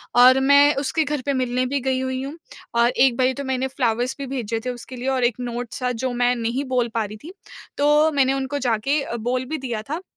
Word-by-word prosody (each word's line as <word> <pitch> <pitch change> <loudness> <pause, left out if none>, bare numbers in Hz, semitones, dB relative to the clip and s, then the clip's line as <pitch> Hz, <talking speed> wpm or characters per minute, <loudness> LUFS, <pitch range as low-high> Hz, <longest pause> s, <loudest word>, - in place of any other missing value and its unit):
और 255 +2 +7
मैं 285 +2 +5
उसके 280 +3 0
घर 295 -2 -2
पे 280 - +1
मिलने 255 -1 0
भी 280 +2 -1
गई 260 0 0
हुई 260 0 -2
हूँ। 285 +4 -7 0.4
और 235 0 +4
एक 255 0 +3
बारी 260 0 +2
तो 280 +2 -5
मैंने 265 0 -1
फ्लावर्स 250 -1 -1
भी 280 - -5
भेजे 235 -4 -3
थे - - -1
उसके 245 +1 -7
लिए 250 +1 -5
और 260 -2 0
एक 240 -2 +2
नोट 245 -1 -5
सा 250 -1 -2
जो 250 +2 -2
मैं 245 0 +2
नहीं 235 +3 -2
बोल 250 -2 0
पा 225 - 0
रही 215 +1 -9
थी। 340 +4 -9 0.4
तो 295 +2 +4
मैंने 270 -2 +2
उनको 270 +1 -2
जाके 255 +4 0
अ, 235 - -5
बोल 245 +3 -2
भी 310 +5 -3
दिया 240 -6 -4
था 315 +4 -3
255 Hz, 240 wpm, -22 LUFS, 245-275 Hz, 0.4 s, और